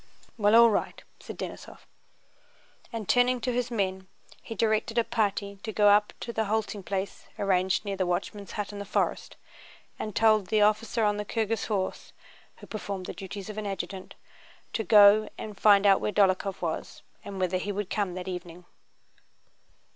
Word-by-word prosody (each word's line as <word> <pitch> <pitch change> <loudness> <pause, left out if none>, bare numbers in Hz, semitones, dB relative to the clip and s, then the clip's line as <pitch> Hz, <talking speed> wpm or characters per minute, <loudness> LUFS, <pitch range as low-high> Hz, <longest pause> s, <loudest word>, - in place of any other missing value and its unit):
"Well, 210 -1 +3
all 235 0 +8
wight," - - -2 0.2
said - - -9
Denísov. - - -8 1.1
And 225 -4 -5
turning 250 0 +3
to 250 +2 -1
his 245 0 -1
men 190 -4 -2 0.3
he 225 - -8
directed 220 +1 0
a 235 - +4
party 205 -3 -2
to 220 - -5
go 210 -1 +4
on 205 +1 +7 0.2
to 235 - -5
the 220 -1 0
halting 215 -1 -2
place 195 +1 -4
arranged 190 0 +1
near 200 -1 -2
the 185 -1 0
watchman's 195 +3 -3
hut 210 -1 -4
in 205 - -7
the 200 - -5
forest, 200 - -1 0.6
and 215 -2 -5
told 215 -3 +4
the 215 +2 +3
officer 215 +2 +1
on 210 -1 +2
the 210 - -2
Kirghíz 225 +1 -2
horse 195 -4 -3 0.4
(who - - -12
performed 200 -3 -5
the - - -5
duties 195 0 -8
of 215 0 -5
an 210 - -4
adjutant) 195 -1 -6 0.6
to 220 - -1
go 210 +1 +6
and 210 -2 -8
find 205 -1 +6
out 195 -1 +5
where - - -1
Dólokhov 195 -2 +1
was 160 -2 -4 0.2
and 195 -1 -7
whether 185 0 0
he 205 +3 -3
would 200 -1 -4
come 200 -4 -1
that 185 0 -6
evening. 180 -1 -7
205 Hz, 175 wpm, -27 LUFS, 195-220 Hz, 1.1 s, all